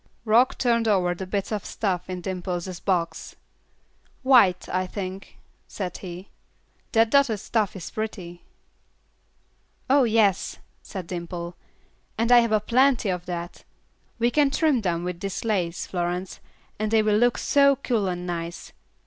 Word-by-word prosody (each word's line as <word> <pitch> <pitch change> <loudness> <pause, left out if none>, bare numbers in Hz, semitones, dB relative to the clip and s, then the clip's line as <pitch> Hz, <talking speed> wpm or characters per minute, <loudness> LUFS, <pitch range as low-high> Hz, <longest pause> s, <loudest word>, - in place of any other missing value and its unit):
Rock 235 +4 +4
turned 235 -2 +2
over 185 -4 +2
the 185 +1 -7
bits 200 +2 -2
of 210 -2 -2
stuff 185 -4 -2
in 180 -1 -4
Dimple's 180 -1 -4
box. 175 -4 -2 0.9
"White, 235 -9 +5
I 185 +1 -1
think," 190 0 -7 0.3
said 185 -4 -5
he; 180 +1 -8 0.6
"that 225 -1 +4
dotted 270 -7 +3
stuff 210 -1 -1
is 185 - -7
pretty." 185 -6 -5 1.5
"Oh, 280 0 +6
yes," 215 -4 +2 0.2
said 190 -4 -7
Dimple, 170 0 -6 0.6
"and 230 +2 +1
I 245 - +9
have 215 -3 +1
plenty 255 -3 +3
of 180 -1 -3
that. 175 -1 -6 0.5
We 235 +1 +2
can 290 0 +3
trim 285 -3 +2
them 175 -4 -1
with 180 -1 -4
this 195 +3 -4
lace, 180 -6 -1
Florence, 180 +1 -3 0.4
and 215 0 0
they 220 0 +3
will 210 -1 +3
look 240 +2 +3
so 280 -1 +4
cool 235 -6 -1
and 180 -1 -3
nice. 170 -1 -5
195 Hz, 145 wpm, -25 LUFS, 180-230 Hz, 1.5 s, I